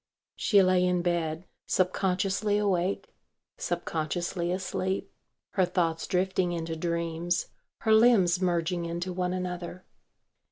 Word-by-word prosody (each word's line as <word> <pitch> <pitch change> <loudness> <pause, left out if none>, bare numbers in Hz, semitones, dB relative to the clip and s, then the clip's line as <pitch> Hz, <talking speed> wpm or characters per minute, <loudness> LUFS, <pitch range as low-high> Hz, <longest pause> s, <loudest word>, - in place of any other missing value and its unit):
She 200 -3 +4
lay 185 -1 +3
in 180 -1 +1
bed 170 -1 -1 0.2
subconsciously 195 +2 +1
awake, 195 -2 0 0.5
subconsciously 175 - -2
asleep, 190 +1 -2 0.4
her 190 - +2
thoughts 170 -2 -1
drifting 185 -1 +1
into 165 -1 -3
dreams, 170 +1 -1 0.3
her 220 - +3
limbs 210 -6 +5
merging 175 -1 0
into 175 +2 -3
one 180 0 -1
another. 180 0 -4
180 Hz, 110 wpm, -28 LUFS, 170-190 Hz, 0.5 s, limbs